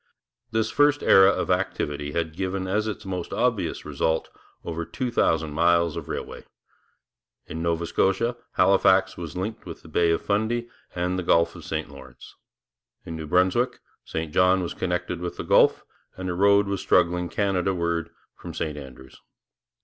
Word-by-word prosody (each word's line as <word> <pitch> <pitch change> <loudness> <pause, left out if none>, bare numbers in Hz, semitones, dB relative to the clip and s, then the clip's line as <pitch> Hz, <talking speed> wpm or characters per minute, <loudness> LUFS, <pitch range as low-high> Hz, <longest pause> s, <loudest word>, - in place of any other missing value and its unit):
This 110 -1 0
first 145 0 +3
era 95 0 +7
of - - 0
activity 75 0 -1
had 80 -1 -2
given 95 +1 -3
as 105 +3 0
its 105 - -5
most 90 -2 -4
obvious 115 -9 -1
result 80 0 -1 0.4
over 85 0 -3
two 120 +10 -4
thousand 80 -8 +1
miles 85 0 +3
of - - -6
railway. - - -6 1.0
In 80 +2 -6
Nova 85 0 0
Scotia, 95 +8 +1 0.2
Halifax 95 -1 +4
was 85 -2 -7
linked 105 +2 -5
with 85 - -9
the - - -13
Bay 85 +2 +2
of 85 - +1
Fundy 110 +4 0 0.3
and 90 +1 -1
the - - -3
Gulf 85 0 +3
of - - -10
St - - -3
Lawrence; 65 -3 -13 0.7
in 80 - -6
New 80 -1 -6
Brunswick, 90 +9 +2 0.2
St 80 -2 -5
John 90 0 +4
was 85 - -4
connected 90 -1 -2
with 90 -1 -5
the - - -4
Gulf, - - +4 0.3
and 95 -1 -3
a - - -2
road 100 +2 +4
was 100 -1 -3
struggling 90 0 +2
Canadaward 90 -4 0 0.3
from - - -9
St 75 -2 -3
Andrews. 65 -1 -13
90 Hz, 165 wpm, -25 LUFS, 85-95 Hz, 1.0 s, era